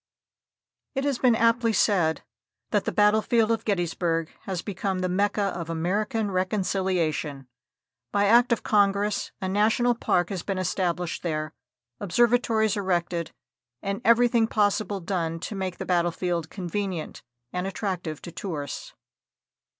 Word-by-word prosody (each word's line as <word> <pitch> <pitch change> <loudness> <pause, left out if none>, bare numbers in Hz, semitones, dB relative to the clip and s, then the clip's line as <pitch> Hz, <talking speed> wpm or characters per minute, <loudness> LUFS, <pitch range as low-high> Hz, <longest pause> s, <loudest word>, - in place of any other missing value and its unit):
It 270 - 0
has 280 -3 0
been 245 -3 +4
aptly 230 0 +3
said 175 -8 +2 0.5
that - - +1
the - - 0
battlefield 215 +2 +3
of 225 -1 0
Gettysburg 170 -4 0
has 185 -3 -3
become 195 -1 -2
the 185 - 0
"Mecca 200 +2 +1
of 170 -1 -5
American 200 +6 -1
Reconciliation." 185 -7 -1 0.6
By 205 0 +2
act 235 +4 +5
of 235 - +1
Congress 205 0 +2
a 190 - -1
National 220 +5 +3
Park 175 -6 +1
has 190 -3 -3
been 195 +2 -3
established 180 -2 -1
there, 155 -2 -3 0.5
observatories 225 +1 +2
erected 175 -4 -1 0.5
and 200 +3 -2
everything 235 0 +4
possible 205 -2 +1
done 165 -2 -2
to - - -5
make 190 -2 -3
the - - -5
battlefield 175 -1 0
convenient 185 -2 -4 0.3
and 180 +1 -2
attractive 180 -6 -4
to 175 - -7
tourists. 160 -5 -5
195 Hz, 130 wpm, -26 LUFS, 175-215 Hz, 0.6 s, act